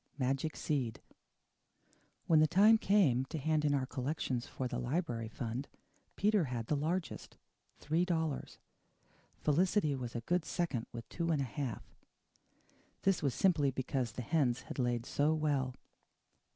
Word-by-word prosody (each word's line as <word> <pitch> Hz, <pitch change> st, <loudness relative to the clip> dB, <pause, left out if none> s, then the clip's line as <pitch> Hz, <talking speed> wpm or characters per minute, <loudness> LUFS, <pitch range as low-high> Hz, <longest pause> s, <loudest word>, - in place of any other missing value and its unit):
MAGIC 135 Hz, +3 st, -1 dB
SEED 130 Hz, -7 st, -1 dB, 1.3 s
When 160 Hz, -2 st, +5 dB
the 155 Hz, -, +5 dB
time 210 Hz, +6 st, +6 dB
came 175 Hz, -, +3 dB
to 160 Hz, +4 st, -5 dB
hand 155 Hz, +1 st, +1 dB
in 145 Hz, -1 st, +3 dB
our 135 Hz, -2 st, 0 dB
collections 130 Hz, -2 st, -2 dB
for 130 Hz, -, -3 dB
the 125 Hz, 0 st, -3 dB
library 120 Hz, -3 st, -2 dB
fund 120 Hz, +4 st, -4 dB, 0.5 s
Peter 205 Hz, -4 st, +3 dB
had 120 Hz, -3 st, -3 dB
the 150 Hz, -, 0 dB
largest 165 Hz, +5 st, -3 dB, 0.4 s
three 160 Hz, +3 st, 0 dB
dollars. 160 Hz, -5 st, -2 dB, 0.8 s
Felicity 160 Hz, +1 st, +2 dB
was 125 Hz, -2 st, -5 dB
a 120 Hz, -, -2 dB
good 175 Hz, +7 st, 0 dB
second 165 Hz, -10 st, -2 dB
with 115 Hz, -1 st, -8 dB
two 170 Hz, -1 st, -2 dB
and 155 Hz, -3 st, +2 dB
a 135 Hz, -, 0 dB
half. 130 Hz, -3 st, -4 dB, 1.2 s
This 195 Hz, -2 st, +2 dB
was 140 Hz, -4 st, 0 dB
simply 160 Hz, -7 st, +3 dB
because 130 Hz, -3 st, -2 dB
the 125 Hz, -, -5 dB
hens 130 Hz, -3 st, +1 dB
had -, -, -8 dB
laid 120 Hz, -1 st, 0 dB
so 150 Hz, +4 st, +2 dB
well. 140 Hz, -5 st, 0 dB
145 Hz, 150 wpm, -34 LUFS, 125-165 Hz, 1.3 s, time